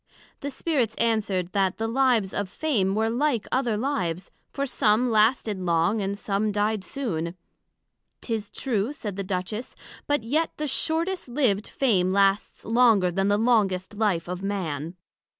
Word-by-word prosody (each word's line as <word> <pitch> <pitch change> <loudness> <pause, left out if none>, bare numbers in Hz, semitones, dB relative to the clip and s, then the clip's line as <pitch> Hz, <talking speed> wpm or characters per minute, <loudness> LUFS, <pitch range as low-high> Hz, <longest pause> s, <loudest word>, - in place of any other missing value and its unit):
The 285 - -4
Spirits 260 -6 -1
answered, 205 -6 0
That 190 -1 +1
the 225 - -1
lives 235 -5 +2
of 205 -2 -2
Fame 205 -7 0
were 220 +1 +1
like 245 -2 0
other 245 -5 +1
lives; 190 - -2 0.2
for 280 - -2
some 240 -1 +2
lasted 215 -2 +2
long, 175 +4 +1
and 200 +1 -2
some 210 +1 -1
died 210 0 0
soon. 180 - -3 0.9
'Tis 225 -3 -3
true, 235 0 -2
said 210 -9 -6
the 195 - -3
Duchess; 195 +5 -4 0.3
but 290 -5 +1
yet 305 +8 0
the 300 - -2
shortest 330 +6 0
liv'd 240 -6 +1
Fame 190 -9 +1
lasts 195 +1 +1
longer 225 -6 +4
then 195 +2 0
the 205 0 +3
longest 210 -5 +1
life 205 -6 0
of 180 +1 -4
Man. 170 -5 -3
215 Hz, 150 wpm, -25 LUFS, 190-245 Hz, 0.9 s, longer